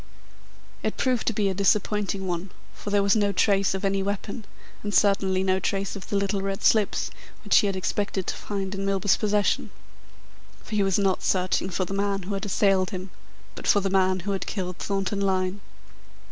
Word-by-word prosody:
It - - -2
proved 255 -3 0
to - - +4
be 210 -2 +1
a 195 - +1
disappointing 200 0 +1
one, 180 +1 -3 0.2
for - - -7
there 200 0 +3
was 200 +1 +3
no 205 -2 +2
trace 195 -1 +2
of 190 +1 -3
any 195 0 +1
weapon, 200 +2 -4 0.4
and 205 0 -3
certainly 195 -2 +3
no 190 0 +2
trace 195 +2 -2
of 195 - -8
the - - -1
little 200 0 0
red 195 0 -3
slips 215 -3 +2 0.3
which - - +5
he 205 - +1
had 195 - -1
expected 190 0 -2
to - - -2
find 195 -2 -4
in 195 0 -3
Milburgh's 195 0 +2
possession. 210 -1 +1 0.9
For - - -10
he 210 - +2
was 195 -2 +2
not 195 -2 +1
searching 185 0 +1
for 185 0 -1
the 195 - -6
man 200 -1 -1
who 195 +3 -4
had 195 +1 -3
assailed 195 -2 +2
him, 185 -2 -6 0.4
but - - -7
for 205 - +5
the 195 -1 -1
man 185 -1 +2
who 200 +3 -3
had 195 - -3
killed 180 -3 -4
Thornton 195 0 -1
Lyne. 190 0 0
195 Hz, 200 wpm, -25 LUFS, 190-205 Hz, 0.9 s, which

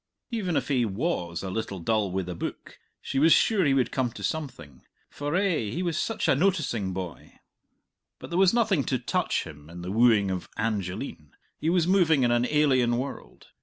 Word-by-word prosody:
Even 195 -8 -1
if - - -1
he 130 -4 +2
was 100 - -2
a 95 - -4
little 110 -1 -3
dull 105 +2 0
wi' 95 +1 -1
the 90 0 -5
book, 85 - -7 0.2
she 135 - -1
was 160 +3 +5
sure 200 +5 +4
he 140 -4 +3
would 130 -2 +1
come 130 -2 0
to 100 - -9
something, 95 - -5 0.3
for, 145 +2 -3
eh, 180 - +1
he 175 - -3
was 170 -3 -1
such 225 +7 -1
a - - +5
noticing 140 - 0
boy. 90 -2 -7 0.8
But - - -11
there 170 - +1
was 190 -2 +6
nothing 220 - +2
to 130 - 0
touch - - -1
him 75 -1 -12
in 85 +1 -9
"The 90 - -4
Wooing 110 -3 +4
of 90 -1 -4
Angeline;" 95 - -3 0.3
he 160 - 0
was 175 -1 +3
moving 170 -7 +3
in 120 - +3
an 120 +1 +2
alien 130 -6 +3
world. 135 +3 -7
125 Hz, 200 wpm, -27 LUFS, -, 0.8 s, was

